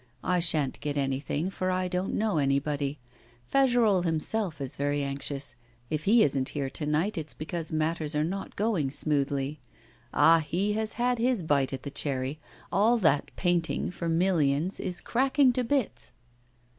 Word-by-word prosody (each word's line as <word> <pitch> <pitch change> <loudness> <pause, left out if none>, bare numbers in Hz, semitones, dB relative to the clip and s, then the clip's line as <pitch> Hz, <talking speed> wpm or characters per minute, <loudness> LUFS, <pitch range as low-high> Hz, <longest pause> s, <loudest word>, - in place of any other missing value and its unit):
I 180 -1 +1
sha'n't 155 -5 +1
get 145 -1 -3
anything, 140 +5 -1
for 185 -1 -2
I 185 0 0
don't 180 +1 -2
know 210 -7 +1
anybody. 140 +1 0 0.6
Fagerolles 240 -8 +4
himself 165 +1 0
is 135 -2 -3
very 145 0 -1
anxious. 140 -1 -2 0.4
If 155 -1 -2
he 220 +3 +6
isn't 135 -2 0
here 135 -2 -2
to 150 +2 -2
night, 165 +6 0
it's 155 -1 -7
because 160 +1 -4
matters 155 -1 0
are 150 - +2
not 195 +5 -4
going 200 -10 0
smoothly. 140 0 0 0.5
Ah! 165 0 +5
he 185 +7 -1
has 220 0 -2
had 245 0 0
his 240 -5 +1
bite 140 -4 +1
at 135 - -5
the 140 - -5
cherry; 135 0 -1 0.3
all 225 +4 +4
that 160 -9 +2
painting 175 -2 0
for 170 -2 -4
millions 165 -1 +1
is 180 - -4
cracking 265 +1 +3
to 255 - 0
bits! 260 -1 -1
160 Hz, 160 wpm, -28 LUFS, 145-195 Hz, 0.6 s, he